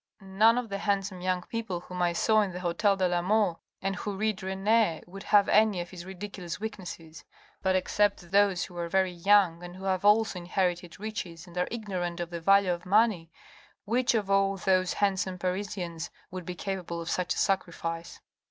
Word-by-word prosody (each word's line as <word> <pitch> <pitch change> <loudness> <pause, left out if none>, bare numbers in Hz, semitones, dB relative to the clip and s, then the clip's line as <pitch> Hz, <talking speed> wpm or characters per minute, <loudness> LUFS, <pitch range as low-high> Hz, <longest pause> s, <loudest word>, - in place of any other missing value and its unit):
" - - -59 0.2
None 230 +2 +7
of 245 -2 -2
the 200 0 -3
handsome 195 -2 -1
young 185 -1 0
people 215 -6 -4
whom 180 0 -6
I 175 -1 +3
saw 215 +5 +3
in 195 -3 -2
the 180 - -5
hotel 190 +3 +1
de 185 -1 +2
la 175 -1 0
Mole, 200 -2 +1 0.2
and 195 0 -1
who 205 0 -4
read 215 -1 -1
Rene, 190 -1 +1
would 195 +3 -10
have 205 0 +4
any 210 -3 +4
of 175 0 -5
his 180 -2 -9
ridiculous 190 -2 -6
weaknesses: 175 -7 -7 0.4
but, 190 0 +2
except 185 -1 +1
those 200 -2 +3
who 180 - -9
are 170 0 -3
very 190 0 +2
young 180 -1 +3
and 175 0 -9
who 190 - -10
have 190 -1 0
also 210 -2 +4
inherited 175 -1 -2
riches 185 -6 -6
and 175 -1 -15
are 180 0 0
ignorant 185 -7 -4
of 175 0 -4
the 170 -1 -5
value 195 +1 +4
of 175 0 -6
money, 200 -4 +2 0.6
which 240 +3 +2
of 210 -3 0
all 195 0 +3
those 185 -1 +2
handsome 190 -2 0
Parisians 180 -2 -3 0.2
would 185 -2 -7
be 180 - -4
capable 180 -2 -4
of 165 - -6
such 180 -1 0
a - - -7
sacrifice 170 -3 -2
185 Hz, 200 wpm, -28 LUFS, 175-205 Hz, 0.6 s, None